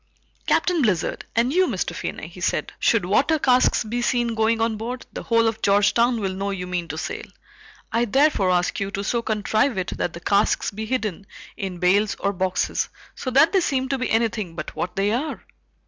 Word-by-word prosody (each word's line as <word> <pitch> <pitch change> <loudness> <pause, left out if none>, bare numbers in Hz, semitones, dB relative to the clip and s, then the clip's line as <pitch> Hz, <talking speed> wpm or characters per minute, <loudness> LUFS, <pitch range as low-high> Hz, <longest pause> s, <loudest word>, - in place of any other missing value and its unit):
"Captain 355 -4 +2
Blizzard, 200 - 0
and 240 +4 +2
you, 370 +1 +4
Mr. - - -2
Finney," - - -5
he - - -12
said, - - -1
"should 225 -6 +2
water 280 - +3
casks 255 -4 +3
be 235 +2 -3
seen 240 -1 +1
going 225 +1 +1
on 225 0 +1
board, 240 +4 -5
the - - -5
whole 230 -1 +2
of 225 0 -2
Georgetown 225 +4 +3
will 195 -3 -2
know 195 +1 -3
you 190 -2 -3
mean 180 -2 -3
to 155 0 -5
sail. - - -5 0.7
I 235 +1 +2
therefore 265 -5 +3
ask 180 -1 +1
you 195 -1 -2
to 200 0 -4
so 235 +3 0
contrive 220 +2 0
it 185 -1 -2
that 175 - -2
the 170 - -7
casks 200 +4 +1
be 215 +2 -6
hidden 215 -6 -2 0.3
in 190 -2 -5
bales 200 +4 +2
or 200 - -1
boxes 185 0 -1 0.2
so 255 - -5
that 275 +5 +5
they 380 - +4
seem 265 -5 0
to 270 -1 -1
be 255 - -1
anything 220 -6 0
but - - -6
what 175 - -3
they 200 +1 +1
are." 270 +8 -3
220 Hz, 205 wpm, -23 LUFS, 195-245 Hz, 0.7 s, that